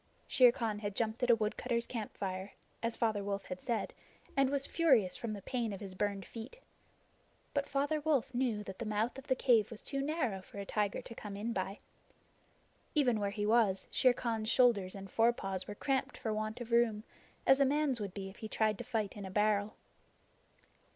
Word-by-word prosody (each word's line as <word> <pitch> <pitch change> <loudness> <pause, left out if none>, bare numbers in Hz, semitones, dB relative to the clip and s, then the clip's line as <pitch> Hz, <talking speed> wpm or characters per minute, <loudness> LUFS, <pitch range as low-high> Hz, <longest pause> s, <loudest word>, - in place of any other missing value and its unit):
Shere 250 -2 +6
Khan 225 -3 -2
had 205 -1 -4
jumped 225 +2 -1
at 245 - +1
a 235 - +8
woodcutter's 235 +2 -1
campfire, 195 -4 -4 0.3
as 230 0 -1
Father 215 -3 0
Wolf 200 0 -3
had 180 0 -6
said, 235 -3 -2 0.4
and 275 -1 +4
was 280 0 +1
furious 255 - +3
from 230 -2 -3
the 200 -2 -7
pain 240 -4 -1
of 195 - -6
his 195 -2 -7
burned 200 0 -1
feet. 230 - -8 1.0
But 285 0 -1
Father 290 +2 0
Wolf 280 -4 +1
knew 240 -4 0
that 195 -2 -8
the 235 - -3
mouth 215 +5 -1
of 270 - -13
the 260 - +3
cave 235 -5 +4
was 225 - -9
too 275 -1 -2
narrow 275 - -1
for 185 - -13
a 200 - -4
tiger 205 0 -1
to 230 - -9
come 210 -3 -7
in 225 +3 -2
by. 195 +1 -2 1.2
Even 250 -7 +3
where 200 -1 0
he 205 +1 -2
was, 215 -3 +3
Shere 255 - +5
Khan's 225 -3 -2
shoulders 230 -7 +4
and 195 0 -7
forepaws 195 -3 +1
were 205 - -6
cramped 270 +4 -1
for 220 - -2
want 215 +2 -3
of 240 0 -7
room, 230 -3 +3 0.4
as 270 +1 +6
a - - +6
man's 275 -3 +1
would 200 -3 -5
be 195 -1 -4
if 195 - -11
he 220 - -6
tried 215 -1 +1
to - - -3
fight 220 -5 -2
in 205 - -7
a 190 - -5
barrel. 210 +1 +1
220 Hz, 205 wpm, -34 LUFS, 205-250 Hz, 1.2 s, a